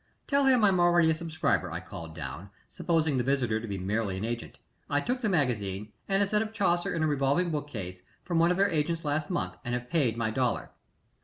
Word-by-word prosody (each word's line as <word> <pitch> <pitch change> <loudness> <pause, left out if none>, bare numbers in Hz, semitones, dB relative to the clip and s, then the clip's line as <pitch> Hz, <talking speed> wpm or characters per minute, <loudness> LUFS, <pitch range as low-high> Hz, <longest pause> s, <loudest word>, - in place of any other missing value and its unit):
"Tell 280 -1 +2
him 255 -4 +5
I'm 195 -3 +4
already 175 -2 +5
a - - +3
subscriber," 160 - -1
I 85 - -3
called 90 -4 -9
down, 80 +5 -7 0.2
supposing 160 -5 0
the 125 - +1
visitor 125 -4 +1
to 115 - -6
be 100 -2 -3
merely 100 +1 -1
an 100 - -3
agent. 120 0 -5 0.3
"I 145 - +2
took 250 - -2
the 225 - +1
magazine, 105 - -1 0.2
and 195 +1 +3
a - - +2
set 210 +2 +1
of 220 0 -4
Chaucer 175 -5 +1
in 160 - 0
a - - +3
revolving 145 +4 +1
bookcase, 110 - -5 0.2
from 170 -3 0
one 170 +1 +5
of 180 - +1
their 200 +1 +3
agents 165 +1 -1
last 150 +1 -1
month 90 0 -2
and 120 0 -2
have 125 0 -6
paid 135 -9 +2
my 115 -2 0
dollar." 125 +1 -1
145 Hz, 225 wpm, -29 LUFS, 110-175 Hz, 0.3 s, him